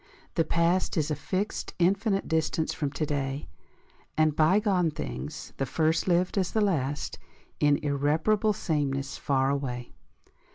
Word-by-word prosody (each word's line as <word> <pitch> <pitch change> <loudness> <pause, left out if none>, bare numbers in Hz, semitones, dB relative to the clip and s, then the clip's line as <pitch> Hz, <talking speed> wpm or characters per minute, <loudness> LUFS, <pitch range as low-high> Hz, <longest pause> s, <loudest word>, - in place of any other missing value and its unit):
The 165 - +2
past 170 +3 +1
Is 155 -1 +1
a - - +1
fixed 190 +7 -3
infinite 195 +3 +2
distance 160 0 0
from 145 -3 -2
to 155 - -1
day, 140 -1 -2 0.7
And 155 -1 +3
bygone 185 +2 +3
things, 70 - -6
the 135 - -1
first 160 +4 +1
lived 180 +2 +2
as 185 - -1
the 220 - +2
last, 150 -9 0 0.4
In 145 -1 +4
irreparable 155 +10 +2
sameness 140 -6 -1
far 135 -1 +1
away. 125 -4 -3
155 Hz, 135 wpm, -28 LUFS, 140-185 Hz, 0.7 s, In